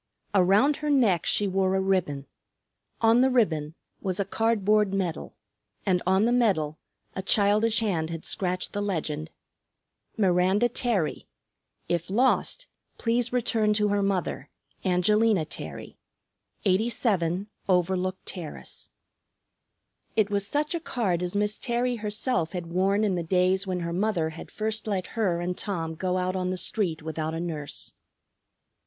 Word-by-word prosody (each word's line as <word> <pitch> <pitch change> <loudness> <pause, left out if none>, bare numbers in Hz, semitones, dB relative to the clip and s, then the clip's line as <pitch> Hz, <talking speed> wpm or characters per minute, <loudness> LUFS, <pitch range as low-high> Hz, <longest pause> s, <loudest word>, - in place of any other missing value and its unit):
Around 200 +10 +4
her 300 -1 -3
neck 230 - +3
she 205 - +2
wore 190 0 +1
a - - +2
ribbon; 185 -8 0 0.8
on 230 +1 +5
the 265 - +4
ribbon 160 - +1 0.3
was 185 -1 -2
a 200 - +1
cardboard 210 -1 +2
medal; 180 -4 -3 0.5
and 185 -3 +2
on 190 +3 +4
the 235 - +2
medal 190 -11 +1 0.4
a 190 - -2
childish 210 +3 +3
hand 170 -7 0
had 165 -1 -6
scratched 180 -1 -2
the 205 - -2
legend, 155 -6 -2 0.9
Miranda 190 +3 +3
Terry. 230 -9 -1 0.6
If 175 0 -1
lost, 260 - +2 0.3
please 235 +1 0
return 235 -3 +1
her - - +4
to 210 0 +2
her 205 0 +1
mother, 195 -2 -1 0.3
Angelina 195 0 +3
Terry, - - -8 0.7
87 195 -3 +1 0.2
Overlook 185 +1 +1
Terrace. 170 -5 -7 1.3
It 215 -2 +2
was 200 -1 0
such 295 +7 0
a 340 - -1
card 210 - -1
as 180 +2 -3
Miss 210 +1 0
Terry 245 0 0
herself 210 -5 -1
had 180 -2 -3
worn 195 +3 +2
in 205 -3 +2
the 175 - -1
days 185 +3 +2
when 180 -1 -2
her 170 0 -3
mother 180 -4 0
had 160 - -10
first 220 0 -3
let 190 -4 -1
her 190 -7 +1
and 180 +1 -2
Tom 165 -6 -3
go 180 +3 -1
out 185 0 -1
on 185 -1 -1
the 185 - -2
street 175 -4 -2
without 160 0 -3
a - - -3
nurse. 155 -4 -5
190 Hz, 150 wpm, -27 LUFS, 175-215 Hz, 1.3 s, on